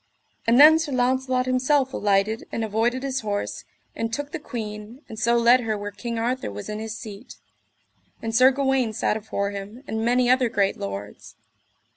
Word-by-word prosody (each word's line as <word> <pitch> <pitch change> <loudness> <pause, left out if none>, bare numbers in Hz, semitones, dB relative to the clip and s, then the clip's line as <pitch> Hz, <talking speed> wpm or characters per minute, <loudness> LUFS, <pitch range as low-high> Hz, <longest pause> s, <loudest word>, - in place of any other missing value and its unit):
And 235 +2 +5
then 315 +2 +9
Sir 320 -3 -3
Launcelot 255 0 +1
himself 260 +1 +1
alighted 205 +2 0
and 225 - -2
avoided 230 +4 0
his 270 -1 -1
horse, 205 -3 -4 0.3
and 225 0 -3
took 290 +4 -4
the 345 - -4
queen, 220 0 -7
and 220 - -8
so 235 +2 +3
led 235 +2 +5
her 220 -3 -2
where 205 0 -5
King 230 +3 -5
Arthur 245 - -1
was 100 +1 -7
in 210 0 -4
his 220 0 -5
seat: 215 +2 -10 0.8
and 225 0 -4
Sir 255 +2 +7
Gawaine 265 -4 0
sat 210 - 0
afore 200 -2 -3
him, 205 +5 -8
and 220 -2 -3
many 245 +1 +2
other 255 -1 +3
great 200 -3 +1
lords. 100 +1 -7
235 Hz, 180 wpm, -24 LUFS, 210-255 Hz, 0.8 s, then